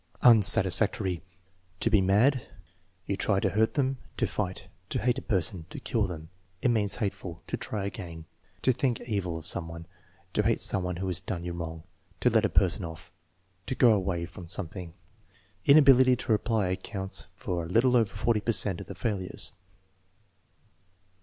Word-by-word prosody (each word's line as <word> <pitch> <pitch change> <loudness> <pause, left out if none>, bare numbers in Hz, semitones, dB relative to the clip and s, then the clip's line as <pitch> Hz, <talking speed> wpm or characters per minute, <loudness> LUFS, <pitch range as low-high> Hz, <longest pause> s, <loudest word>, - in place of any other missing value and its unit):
Unsatisfactory. 100 -4 +5 0.6
"To 115 - +1
be 105 -3 +5
mad." 115 +8 +3 0.6
"You 100 - -1
try 100 0 +1
to - - 0
hurt 110 +2 +1
them." 135 -2 0 0.2
"To - - +1
fight." 95 -2 -4 0.2
"You - - 0
hate 125 +4 +1
a - - -11
person." 95 -6 -2
"To - - -7
kill 110 -6 0
them." 80 -2 -8 0.3
"It 125 - +1
means 105 -4 +1
hate 105 -5 -1
ful." 85 -3 -9
"To - - -3
try 105 -3 -4
again." 85 -5 -7 0.4
"To 130 - +5
think 120 -1 0
evil 100 -7 -2
of 80 - -9
some 80 - +1
one." 85 0 -9 0.5
"To - - +2
hate - - +1
some 100 - +1
one 90 0 -3
who 95 +2 -4
has 90 -2 0
done 90 -2 -5
you 90 0 -4
wrong." 80 -1 -6 0.4
"To - - +3
let - - +3
a - - +1
person - - +2
off." 80 -1 -9 0.6
"To 130 - -2
go 120 -2 +6
away 90 -4 -1
from 85 -1 -11
something." 90 -2 -5 0.7
Inability 135 -3 +7
to 120 - -3
reply 110 -2 +1
accounts 95 +1 -4
for 85 -1 -3
a - - -6
little 125 +6 +3
over 115 -4 +3
40 110 +1 0
per 115 +2 0
cent 95 -4 0
of - - -10
the - - -8
failures. 100 -6 -3
100 Hz, 180 wpm, -28 LUFS, 90-115 Hz, 0.7 s, Inability